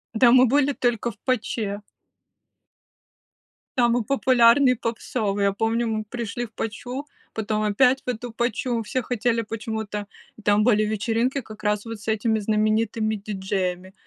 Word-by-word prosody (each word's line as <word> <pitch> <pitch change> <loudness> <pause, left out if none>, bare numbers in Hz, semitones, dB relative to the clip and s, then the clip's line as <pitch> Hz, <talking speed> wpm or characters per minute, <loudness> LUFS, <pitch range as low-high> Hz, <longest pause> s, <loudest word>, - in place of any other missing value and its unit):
Да 235 +2 +6
мы 255 +1 +7
были 280 +3 +3
только 240 -3 0
в 200 - -19
"Паче". 215 -5 -1 2.0
Самый 240 -1 +3
популярный, 255 0 +4
попсовый. 220 -3 -2
Я 200 - +3
помню, 225 +3 0
мы 215 -1 -2
пришли 235 +1 -4
в 225 - -16
"Пачу", 250 +6 -5 0.3
потом 215 -1 -1
опять 250 +5 +3
в - - -42
эту 245 0 -3
"Пачу", 240 +1 -1
все 255 +4 -2
хотели 235 -1 0
почему-то. 220 -2 -5 0.4
Там 205 0 +4
были 215 -2 +4
вечеринки 225 +5 0
как 215 -2 -12
раз 210 -1 +1
вот 225 -2 -7
с 215 - -14
этими 220 0 +1
знаменитыми 215 +1 +1
диджеями. 190 -2 -3
225 Hz, 140 wpm, -24 LUFS, 210-245 Hz, 2.0 s, мы